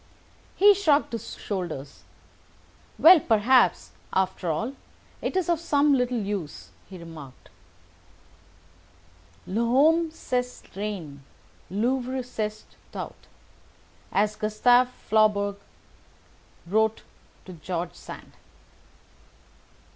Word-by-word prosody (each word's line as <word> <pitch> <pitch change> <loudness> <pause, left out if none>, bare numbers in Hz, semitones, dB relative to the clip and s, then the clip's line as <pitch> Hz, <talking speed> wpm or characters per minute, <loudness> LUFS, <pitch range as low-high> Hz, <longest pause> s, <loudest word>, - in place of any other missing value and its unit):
He 410 +2 +7
shrugged 315 -7 +2
his 230 - -6
shoulders. 170 -8 -6 0.9
"Well, 345 +1 +8
perhaps, 245 +1 +3 0.2
after 185 -2 -1
all, 225 - -2 0.5
it - - -2
is 370 - 0
of 340 -2 +1
some 290 -3 +2
little 250 -2 +1
use," 200 -8 -5 0.2
he 190 - -9
remarked. 160 -6 -12 1.9
"'L'homme 275 - +3
c'est 250 -5 -4
rien—l'œuvre 210 - -4
c'est 215 -3 -4 0.3
tout,' - - -8 0.8
as 210 +1 +1
Gustave 245 +4 +3
Flaubert 210 -4 +1 1.1
wrote 220 +4 +1 0.4
to 185 - -9
George 175 +1 -4
Sand." - - -11
215 Hz, 85 wpm, -26 LUFS, 190-260 Hz, 1.9 s, Well